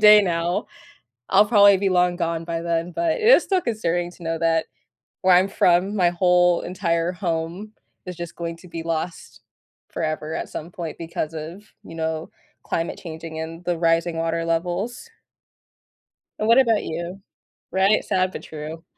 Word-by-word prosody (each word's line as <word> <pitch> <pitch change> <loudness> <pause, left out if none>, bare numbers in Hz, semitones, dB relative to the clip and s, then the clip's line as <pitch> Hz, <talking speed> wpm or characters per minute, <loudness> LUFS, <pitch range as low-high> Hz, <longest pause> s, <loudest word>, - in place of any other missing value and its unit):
day 210 0 +8
now, 175 -1 -1 0.6
I'll 195 +2 +6
probably 205 -2 +6
be 195 +1 0
long 180 -1 +3
gone 170 -1 -2
by 165 0 -3
then, 170 +1 -2
but 330 - 0
it 475 - -5
is - - +8
still 380 -2 +1
concerning 175 - -1
to 180 - -16
know 165 0 -2
that 165 -1 +1 0.6
where 185 -1 +6
I'm 185 +2 +4
from, 190 +2 +2
my 180 -3 +3
whole 180 0 +3
entire 170 -2 -1
home 175 +3 -3 0.3
is 180 - -5
just 170 0 -8
going 170 -1 -4
to 180 - -15
be 165 -1 -6
lost 165 +1 -4 0.5
forever 155 -1 -3
at - - -4
some 165 - -7
point 175 -5 -6
because 165 -1 -4
of, 165 +6 -7 0.2
you - - -11
know, 160 0 -3 0.3
climate 165 0 -3
changing 160 -1 -7
and 165 +2 -7
the 175 -1 0
rising 165 0 +1
water 165 0 -1
levels. 175 - -2 1.3
And 215 - 0
what 230 +2 +6
about 230 -5 +4
you? 170 +4 -5 0.5
Right, 195 +3 +3
sad 185 0 0
but - - -7
true. 155 +1 -8
175 Hz, 170 wpm, -23 LUFS, 165-190 Hz, 1.3 s, day